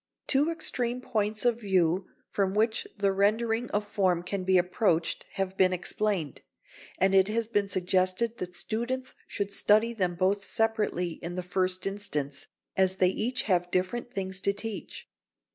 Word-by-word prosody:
] - - -54
Two 285 +3 +3
extreme 250 -7 -1
points 215 -3 -1
of 235 -1 +3
view 185 -2 +2 0.2
from 195 -1 0
which 220 +1 +1
the 200 -1 +2
rendering 225 +4 +1
of 205 0 -1
form 185 -4 +1
can 185 +1 -3
be 190 0 +4
approached 175 -2 +1
have 190 -1 -2
been 185 -1 +4
explained, 185 -3 -1 0.6
and 190 +1 +3
it 190 0 +5
has 225 +2 0
been 205 -3 0
suggested 185 +5 0
that 180 -1 -5
students 240 +8 -2
should 200 0 -3
study 215 +3 +3
them 185 -5 0
both 195 +3 +1
separately 210 -7 0
in 175 +1 -5
the 180 - -3
first 185 +1 0
instance, 150 -9 -3 0.3
as 190 0 +3
they 185 -1 +4
each 235 +6 -2
have 180 -3 +1
different 185 +7 -1
things 190 -2 -3
to 200 - +1
teach. 215 +1 -6
195 Hz, 160 wpm, -28 LUFS, 185-220 Hz, 0.6 s, it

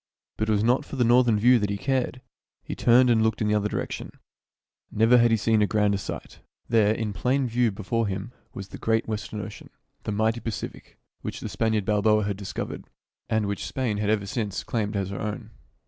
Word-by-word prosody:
But 110 0 -2
it - - +3
was 105 -1 +2
not 120 +3 +3
for - - -8
the 125 - +2
northern 120 -1 +4
view 120 +3 +5
that 105 -1 -1
he 100 - -1
cared. 130 +2 -1 0.4
He - - -5
turned 125 +1 +5
and 110 -1 +3
looked 110 0 +1
in 105 - 0
the 105 - +2
other 105 0 +1
direction. - - -4 0.8
Never 115 +3 +5
had 120 0 +5
he 115 - +3
seen 110 0 +2
a 105 - +3
grander 105 -2 +1
sight. - - -7 0.3
There, 110 -3 +4
in 110 -2 -3
plain 130 +5 +1
view 120 0 +2
before 110 +3 -2
him, 95 +3 -4 0.2
was 95 0 -8
the - - -9
great 115 0 +1
western 105 -1 -4
ocean, 105 0 -9 0.4
the - - -2
mighty 110 +3 +1
Pacific, 115 -3 -6 0.2
which - - -5
the - - -5
Spaniard 110 -3 0
Balboa 105 +1 +3
had 100 0 -2
discovered, 100 -1 -6 0.4
and 110 -1 +1
which 100 0 -3
Spain 125 -6 -2
had 105 0 -1
ever 105 -2 +1
since 100 -1 -3
claimed 105 -2 -2
as 100 -1 -2
her 100 - -5
own. 105 -2 -5
110 Hz, 210 wpm, -26 LUFS, 105-115 Hz, 0.8 s, view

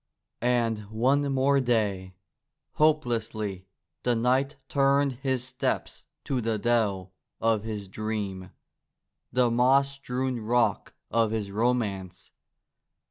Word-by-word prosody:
And 120 -2 +1
one 135 +6 +2
more 135 +1 +3
day! 105 -7 0 0.6
Hopelessly 115 -10 0 0.3
the 125 -1 +1
knight 130 +5 +1
turned 140 -2 +2
his 130 -2 0
steps 130 0 -3 0.2
to 130 -2 -1
the 115 -1 0
dell 100 -5 0 0.3
of 115 -2 +2
his 105 -3 -5
dream, 100 -2 -4 0.8
the 125 -1 +3
moss 135 +4 +4
strewn 130 -2 -3
rock 120 +2 0 0.2
of 115 -1 +3
his 105 -2 -3
romance. 100 -5 -1
120 Hz, 105 wpm, -27 LUFS, 105-130 Hz, 0.8 s, moss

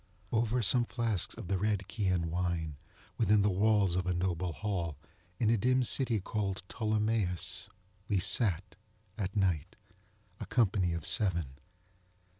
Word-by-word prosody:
Over 115 +1 +1
some 120 +4 +4
flasks 115 -7 -1
of - - -8
the 95 0 0
red 105 -1 0
Chian 95 -7 0
wine, 85 -3 -1 0.4
within 105 +1 +4
the 105 - +3
walls 100 -2 +3
of 90 0 -1
a 90 - +1
noble 90 0 -1
hall, 85 -5 -3 0.4
in 110 -1 +3
a 115 - +4
dim 130 +4 +3
city 125 -2 +2
called 95 -2 -3
Ptolemais, 110 -5 -1 0.4
we 100 - +1
sat, 95 -1 +1 0.4
at 100 -2 -3
night, 90 -7 0 0.6
a - - -6
company 95 -7 +2
of 85 -2 -4
seven. 85 -10 0
100 Hz, 140 wpm, -32 LUFS, 90-110 Hz, 0.6 s, some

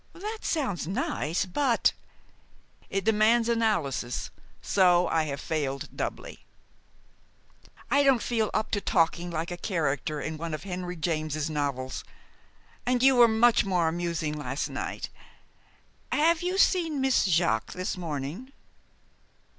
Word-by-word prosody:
"That 425 +5 -6
sounds 230 - -1
nice, 195 - -1
but 240 +6 +2 0.5
" - - -33 0.3
"It 195 0 -1
demands 225 +2 +4
analysis, 205 - 0 0.3
so 180 -2 +3
I 160 -1 +1
have 140 -2 -4
failed 140 -4 -3
doubly." - - -5 1.5
"I 285 - +5
don't 270 -4 +4
feel 225 -3 0
up 215 0 -1
to 205 - 0
talking 170 0 +1
like 165 +1 -3
a 175 - -4
character 155 -5 -1
in 155 +1 -4
one 165 -1 -3
of 155 - -9
Henry 180 -2 -5
James's 155 -2 -2
novels. 140 -3 -2 0.8
And 250 0 +1
you 265 0 +6
were 240 -1 +7
much 225 +1 +4
more 180 -4 +1
amusing 165 -2 -2
last 140 -1 -3
night. - - -5 1.0
Have 320 +2 +3
you 365 +2 -1
seen 335 -6 +3
Miss 265 -4 +3
Jaques 165 - +1
this 185 0 -2
morning?" 165 - -5
180 Hz, 130 wpm, -27 LUFS, 155-235 Hz, 1.5 s, were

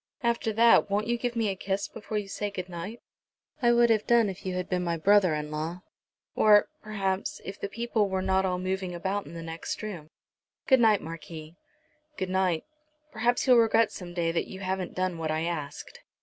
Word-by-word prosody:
After 235 -1 +1
that 230 -1 +5
won't 205 +2 0
you 240 +1 +1
give 240 0 -3
me 225 -2 +1
a 195 - -2
kiss 195 +1 -2
before 215 0 -5
you 205 -1 -3
say 205 +1 -3
good 185 -2 -6
night." 180 +7 -7 0.6
"I 240 -1 +5
would 235 0 +5
have 215 -2 +1
done 235 -3 +4
if 190 0 -7
you 185 - -2
had 180 0 -2
been 180 -1 -1
my 170 -1 -1
brother 190 -1 +4
in 150 0 -4
law, 160 +4 -4 0.5
or, 210 -1 +5
perhaps, 195 -3 -2
if 195 - -7
the 200 - -3
people 225 -2 0
were 190 0 -1
not 190 0 +2
all 180 -1 0
moving 185 -1 -3
about 190 +4 -2
in - - -10
the 165 - -6
next 165 +5 -5
room. 175 -8 -6 0.6
Good 265 -4 +5
night, 220 -3 +4
Marquis." 160 0 -8 0.6
"Good 185 -1 -3
night. 185 -3 +1 0.5
Perhaps 240 +2 +1
you'll 255 -2 +6
regret 225 0 +4
some 175 -2 -9
day 170 -2 +1
that 165 - -1
you 190 - -8
haven't 185 -1 -3
done 185 -2 -1
what 160 -1 -2
I 155 0 0
asked." 165 -4 -5
190 Hz, 205 wpm, -28 LUFS, 175-215 Hz, 0.6 s, you'll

